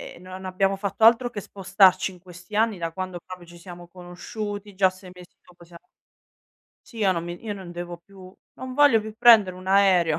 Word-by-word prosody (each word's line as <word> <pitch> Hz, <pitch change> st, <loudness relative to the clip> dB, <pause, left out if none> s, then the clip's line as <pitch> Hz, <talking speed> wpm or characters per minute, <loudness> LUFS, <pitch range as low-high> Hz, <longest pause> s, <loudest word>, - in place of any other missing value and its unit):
ehm 175 Hz, -, -16 dB
non 185 Hz, +1 st, -10 dB
abbiamo 195 Hz, +1 st, 0 dB
fatto 200 Hz, +2 st, -4 dB
altro 235 Hz, +2 st, +5 dB
che 205 Hz, -4 st, -7 dB
spostarci 190 Hz, -1 st, +2 dB
in 180 Hz, -, -15 dB
questi 180 Hz, +2 st, -13 dB
anni, 220 Hz, -4 st, +1 dB
da 165 Hz, -1 st, -4 dB
quando 185 Hz, 0 st, -6 dB
proprio 180 Hz, -1 st, -11 dB
ci 170 Hz, 0 st, -15 dB
siamo 175 Hz, 0 st, -12 dB
conosciuti, 205 Hz, +4 st, -8 dB
già 190 Hz, 0 st, +3 dB
6 185 Hz, 0 st, -14 dB
mesi 180 Hz, -1 st, -16 dB
dopo 175 Hz, -1 st, -19 dB
siamo 170 Hz, 0 st, -17 dB, 1.0 s
Sì, 230 Hz, -, -13 dB
io 195 Hz, -3 st, +2 dB
non 170 Hz, -1 st, -4 dB
mi 175 Hz, 0 st, -8 dB
io 215 Hz, -3 st, -5 dB
non 185 Hz, -3 st, -10 dB
devo 175 Hz, 0 st, -7 dB
più 185 Hz, +1 st, -16 dB, 0.3 s
non 255 Hz, 0 st, -8 dB
voglio 285 Hz, -6 st, +5 dB
più 215 Hz, 0 st, -9 dB
prendere 220 Hz, -6 st, +5 dB
un 185 Hz, 0 st, -13 dB
aereo. 190 Hz, -5 st, +3 dB
185 Hz, 205 wpm, -24 LUFS, 175-205 Hz, 1.0 s, altro